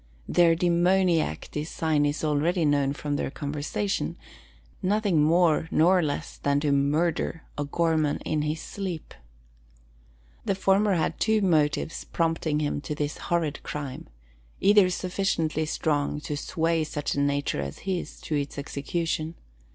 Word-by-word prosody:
Their 170 Hz, -1 st, +4 dB
demoniac 175 Hz, -, +2 dB
design 150 Hz, -1 st, 0 dB
is 145 Hz, +2 st, -2 dB
already 155 Hz, +3 st, +1 dB
known 145 Hz, -2 st, +2 dB
from 145 Hz, 0 st, -3 dB
their -, -, -2 dB
conversation, 140 Hz, -8 st, -3 dB, 0.6 s
nothing 200 Hz, -4 st, +2 dB
more 160 Hz, 0 st, +3 dB
nor 180 Hz, +3 st, +4 dB
less 145 Hz, -3 st, -3 dB
than 140 Hz, 0 st, +1 dB
to 145 Hz, -1 st, +1 dB
murder 155 Hz, +3 st, +1 dB
O'Gorman 155 Hz, 0 st, +1 dB
in 155 Hz, -1 st, 0 dB
his 150 Hz, +1 st, -2 dB
sleep! 185 Hz, -5 st, -5 dB, 1.3 s
The 195 Hz, -, 0 dB
former 195 Hz, +1 st, +3 dB
had 160 Hz, -, -1 dB
two 220 Hz, -2 st, +2 dB
motives 155 Hz, -3 st, +1 dB
prompting 165 Hz, -2 st, 0 dB
him 145 Hz, -1 st, -1 dB
to 150 Hz, -, -4 dB
this 145 Hz, 0 st, -3 dB
horrid 165 Hz, -4 st, 0 dB
crime, 140 Hz, -3 st, -6 dB, 0.5 s
either 200 Hz, -2 st, +5 dB
sufficiently 175 Hz, -4 st, -1 dB
strong 150 Hz, -1 st, 0 dB
to 150 Hz, -, -4 dB
sway 165 Hz, +2 st, 0 dB
such 150 Hz, -1 st, -3 dB
a -, -, -1 dB
nature 140 Hz, -, 0 dB
as 70 Hz, 0 st, -5 dB
his 185 Hz, -3 st, -3 dB
to -, -, -5 dB
its 145 Hz, -1 st, -2 dB
execution. 155 Hz, +3 st, -3 dB
155 Hz, 135 wpm, -26 LUFS, 145-175 Hz, 1.3 s, either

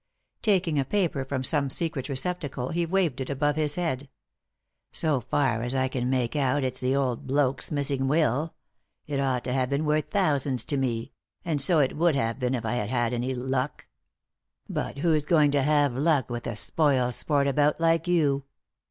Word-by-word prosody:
Taking 180 Hz, -8 st, +2 dB
a -, -, +2 dB
paper 170 Hz, -5 st, 0 dB
from 135 Hz, -1 st, -3 dB
some 145 Hz, 0 st, +1 dB
secret 155 Hz, -2 st, -1 dB
receptacle 140 Hz, -3 st, -2 dB
he 170 Hz, +1 st, -1 dB
waved 170 Hz, -7 st, 0 dB
it 130 Hz, -, -4 dB
above 145 Hz, +1 st, 0 dB
his 150 Hz, -2 st, +1 dB
head. 145 Hz, -6 st, -2 dB, 0.4 s
" -, -, -58 dB, 0.3 s
So 150 Hz, -5 st, +1 dB
rkr 120 Hz, -5 st, +1 dB
as 120 Hz, +2 st, -2 dB
I 130 Hz, 0 st, +1 dB
can 125 Hz, -1 st, -2 dB
make 130 Hz, 0 st, 0 dB
out 140 Hz, 0 st, +1 dB
it's 130 Hz, 0 st, -1 dB
the 130 Hz, +1 st, +1 dB
old 130 Hz, -4 st, -1 dB
bloke's 135 Hz, -1 st, 0 dB
missing 140 Hz, -3 st, -1 dB
will 150 Hz, +1 st, +1 dB, 0.3 s
— -, -, -53 dB
it 145 Hz, -2 st, -2 dB
ought 130 Hz, -3 st, 0 dB
to 125 Hz, -, -2 dB
have 130 Hz, -1 st, 0 dB
been 140 Hz, +3 st, 0 dB
worth 150 Hz, 0 st, 0 dB
thousands 145 Hz, -, +1 dB
to 145 Hz, -, -1 dB
me; 120 Hz, -4 st, -2 dB, 0.3 s
and 155 Hz, -4 st, 0 dB
so 165 Hz, +4 st, +3 dB
it 140 Hz, -4 st, +2 dB
would 170 Hz, -1 st, +3 dB
have 115 Hz, -2 st, -1 dB
been 125 Hz, 0 st, 0 dB
if 115 Hz, -3 st, -4 dB
I 110 Hz, -, -1 dB
had 105 Hz, -4 st, -2 dB
had 120 Hz, -1 st, 0 dB
any 125 Hz, +2 st, -2 dB
luck. 130 Hz, +2 st, -3 dB, 0.8 s
But -, -, -4 dB
who'i 155 Hz, +1 st, +2 dB
going 155 Hz, -4 st, +4 dB
to 140 Hz, -1 st, +2 dB
have 145 Hz, -1 st, +2 dB
luck 140 Hz, -3 st, +1 dB
with 120 Hz, 0 st, -4 dB
a 115 Hz, -, -3 dB
spoil 130 Hz, 0 st, +1 dB
sport 140 Hz, +2 st, +1 dB
about 145 Hz, +2 st, +2 dB
like 165 Hz, +1 st, +2 dB
you 145 Hz, -6 st, +2 dB
140 Hz, 195 wpm, -26 LUFS, 130-155 Hz, 0.8 s, going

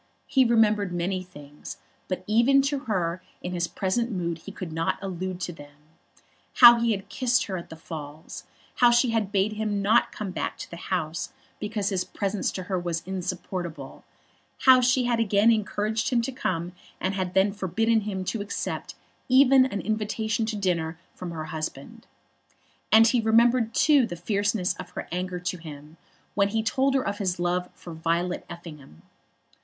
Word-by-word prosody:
He 265 Hz, -, +3 dB
remembered 215 Hz, -5 st, +3 dB
many 180 Hz, +2 st, -1 dB
things, 150 Hz, -5 st, -11 dB, 0.3 s
but 185 Hz, -1 st, -3 dB
even 240 Hz, +6 st, +4 dB
to 280 Hz, 0 st, 0 dB
her 185 Hz, -5 st, -1 dB, 0.2 s
in 180 Hz, -, -4 dB
his 175 Hz, -1 st, -1 dB
present 230 Hz, +8 st, -1 dB
mood 170 Hz, -4 st, -2 dB
he 200 Hz, -, -9 dB
could 185 Hz, -5 st, -7 dB
not 165 Hz, +1 st, 0 dB
allude 185 Hz, -1 st, -4 dB
to 175 Hz, -, -3 dB
them; 145 Hz, -2 st, -14 dB, 0.8 s
how 240 Hz, -1 st, +9 dB
he 235 Hz, 0 st, +1 dB
had 195 Hz, -1 st, -5 dB
kissed 250 Hz, +3 st, +1 dB
her 190 Hz, -, -4 dB
at 170 Hz, -, -7 dB
the -, -, -8 dB
Falls, 155 Hz, -1 st, -9 dB, 0.3 s
how 245 Hz, -, +6 dB
she 240 Hz, 0 st, +3 dB
had 220 Hz, -3 st, 0 dB
bade 205 Hz, +1 st, +1 dB
him 210 Hz, -1 st, -2 dB
not 210 Hz, +4 st, +3 dB
come 205 Hz, -3 st, -5 dB
back -, -, -3 dB
to -, -, -8 dB
the 170 Hz, -, -7 dB
house 170 Hz, +5 st, -2 dB, 0.3 s
because 210 Hz, -1 st, -2 dB
his 190 Hz, -3 st, 0 dB
presence 200 Hz, +1 st, -2 dB
to 185 Hz, -, -4 dB
her 185 Hz, 0 st, -2 dB
was 170 Hz, -2 st, -3 dB
insupportable; 180 Hz, -5 st, -5 dB, 0.6 s
how 260 Hz, -1 st, +7 dB
she 255 Hz, +1 st, +3 dB
had 240 Hz, -1 st, +1 dB
again 215 Hz, 0 st, +4 dB
encouraged 215 Hz, 0 st, 0 dB
him 240 Hz, -2 st, +1 dB
to 270 Hz, -, -3 dB
come, 175 Hz, -8 st, -2 dB, 0.3 s
and 185 Hz, -, -1 dB
had 185 Hz, -2 st, -3 dB
then 195 Hz, +1 st, +4 dB
forbidden 215 Hz, +4 st, +1 dB
him 195 Hz, -3 st, -4 dB
to 220 Hz, +3 st, -2 dB
accept 205 Hz, -, -4 dB, 0.3 s
even 265 Hz, 0 st, +6 dB
an 200 Hz, -6 st, -4 dB
invitation 220 Hz, +1 st, -1 dB
to 220 Hz, -, -2 dB
dinner 170 Hz, -5 st, -1 dB, 0.2 s
from 180 Hz, -, -7 dB
her 160 Hz, -2 st, -5 dB
husband. 160 Hz, -, -6 dB, 0.8 s
And 225 Hz, +1 st, +8 dB
he 235 Hz, +1 st, +3 dB
remembered 230 Hz, +1 st, +3 dB
too 285 Hz, -6 st, +4 dB
the 175 Hz, -, -6 dB
fierceness 200 Hz, +1 st, 0 dB
of 175 Hz, -, -8 dB
her -, -, -5 dB
anger 180 Hz, +1 st, -3 dB
to 180 Hz, +1 st, -3 dB
him 155 Hz, 0 st, -11 dB, 0.4 s
when 200 Hz, -1 st, +3 dB
he 220 Hz, +2 st, -1 dB
told 265 Hz, +4 st, +1 dB
her 265 Hz, -, +1 dB
of 200 Hz, +1 st, -3 dB
his 185 Hz, -3 st, -1 dB
love 180 Hz, +1 st, -1 dB
for 170 Hz, -, -10 dB
Violet 170 Hz, +2 st, -1 dB
Effingham. 150 Hz, -, -11 dB
195 Hz, 180 wpm, -26 LUFS, 175-225 Hz, 0.8 s, how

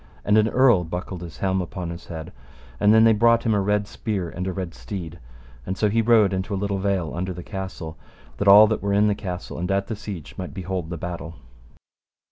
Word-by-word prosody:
And 105 Hz, -, +3 dB
an 110 Hz, +1 st, +4 dB
earl 120 Hz, -8 st, +4 dB
buckled 90 Hz, +1 st, -5 dB
his 85 Hz, -3 st, -9 dB
helm 95 Hz, -1 st, 0 dB
upon 90 Hz, -1 st, -5 dB
his 85 Hz, +1 st, -9 dB
head, 80 Hz, +1 st, -7 dB, 0.5 s
and 105 Hz, -, +5 dB
then 110 Hz, +1 st, +6 dB
they 115 Hz, 0 st, +6 dB
brought 115 Hz, +2 st, +4 dB
him 115 Hz, -, +3 dB
a 100 Hz, -, +2 dB
red 105 Hz, +1 st, +1 dB
spear 100 Hz, -5 st, -4 dB
and 90 Hz, +1 st, -4 dB
a -, -, -1 dB
red 90 Hz, -1 st, -5 dB
steed, 80 Hz, +8 st, -7 dB, 0.4 s
and 95 Hz, +9 st, -4 dB
so 105 Hz, -, +2 dB
he 115 Hz, +2 st, +3 dB
rode 110 Hz, -4 st, +4 dB
into 95 Hz, +2 st, -2 dB
a -, -, -2 dB
little 100 Hz, 0 st, -2 dB
vale 95 Hz, -4 st, -1 dB
under 90 Hz, +2 st, -3 dB
the 90 Hz, 0 st, -8 dB
castle, 95 Hz, -5 st, -7 dB, 0.4 s
that 100 Hz, -, -2 dB
all 105 Hz, +2 st, +10 dB
that 110 Hz, 0 st, -1 dB
were 100 Hz, 0 st, -1 dB
in 100 Hz, +1 st, +4 dB
the 105 Hz, -, +3 dB
castle 95 Hz, -4 st, -6 dB
and 90 Hz, +2 st, -3 dB
at 100 Hz, 0 st, +1 dB
the 110 Hz, -, -4 dB
siege 100 Hz, -6 st, -8 dB
might 90 Hz, +2 st, -6 dB
behold 95 Hz, -3 st, -4 dB
the 85 Hz, -, -4 dB
battle. 85 Hz, 0 st, -6 dB
95 Hz, 230 wpm, -23 LUFS, 90-105 Hz, 0.5 s, all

